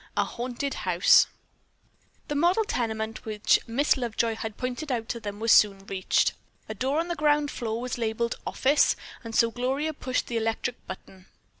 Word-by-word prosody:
A - - +4
HAUNTED 250 +3 -4
HOUSE 180 0 +4 1.0
The - - -2
model 345 +9 +3
tenement 220 - -3
which 215 -1 +2
Miss 265 +6 +2
Lovejoy 235 -2 -1
had 220 -1 -6
pointed 255 +4 -4
out 230 -3 -2
to 235 - -3
them 205 -2 -6
was 225 0 +2
soon 195 -2 +5
reached. 190 -2 +1 0.3
A 220 - -4
door 265 +8 0
on 335 - -1
the 345 - -1
ground 295 -2 +2
floor 225 -2 -3
was 250 0 -4
labeled 230 +1 -1
"Office," 285 +3 +3 0.3
and 225 -1 -7
so 230 -1 +4
Gloria 265 +6 -1
pushed 255 -3 -2
the 235 - -3
electric 225 +2 -2
button. 190 0 -10
235 Hz, 170 wpm, -27 LUFS, 220-275 Hz, 1.0 s, soon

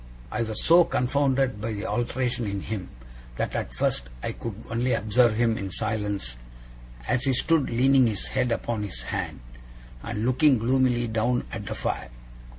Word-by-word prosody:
I - - -1
was 110 -2 -2
so 170 +2 +7
confounded 135 -5 +1
by 110 +1 -2
the 105 +1 -4
alteration 120 0 -1
in 100 -1 -3
him, 100 -4 -5 0.5
that - - -2
at - - -2
first - - 0
I - - -1
could 115 -3 -6 0.2
only 120 +2 +1
observe 110 +2 +3
him 115 -1 +2
in 100 -1 -4
silence, 105 - -3 0.7
as 130 +2 +1
he 135 - +3
stood 150 +3 +2
leaning 130 +2 +4
his 105 -3 -2
head 125 -2 0
upon 115 -1 -1
his 75 -13 -5
hand, - - -4 0.6
and 110 - -3
looking 130 +2 +4
gloomily 120 +1 +2
down 115 +2 0
at 105 -3 -6
the - - -3
fire. - - -3
115 Hz, 165 wpm, -26 LUFS, 105-130 Hz, 0.7 s, so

